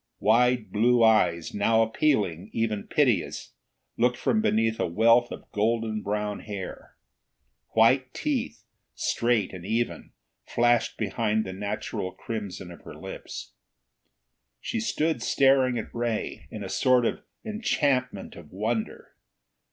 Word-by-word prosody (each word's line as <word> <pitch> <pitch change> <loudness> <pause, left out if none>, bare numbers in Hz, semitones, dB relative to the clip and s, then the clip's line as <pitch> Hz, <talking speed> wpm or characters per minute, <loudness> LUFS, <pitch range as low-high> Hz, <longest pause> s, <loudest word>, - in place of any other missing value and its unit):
Wide 120 +1 +3
blue 120 +3 +3
eyes, 85 -7 +3
now 110 +2 +3
appealing, 110 - 0
even 110 -2 -1
piteous, 125 - 0 0.4
looked 120 +1 +2
from 215 - +1
beneath 115 - +1
a - - +1
wealth 115 +7 +4
of - - -9
golden 110 0 0
brown 105 0 -2
hair. 100 -3 -8 0.8
White 130 +3 +4
teeth, 270 - -3 0.3
straight 115 -5 0
and 90 -2 -8
even, 115 +5 -2 0.3
flashed 120 0 +2
behind 110 +1 0
the 95 - -5
natural 100 -1 -4
crimson 100 -5 -6
of 85 - -12
her - - -11
lips. - - -8 1.1
She - - -3
stood 155 +8 0
staring 135 -2 +3
at 110 - -6
Ray, 120 -2 -3
in - - -7
a - - -5
sort 125 -2 +3
of - - -1 0.3
enchantment 140 - -1
of 80 -3 -13
wonder. 110 +4 -3
115 Hz, 125 wpm, -26 LUFS, 105-125 Hz, 1.1 s, wealth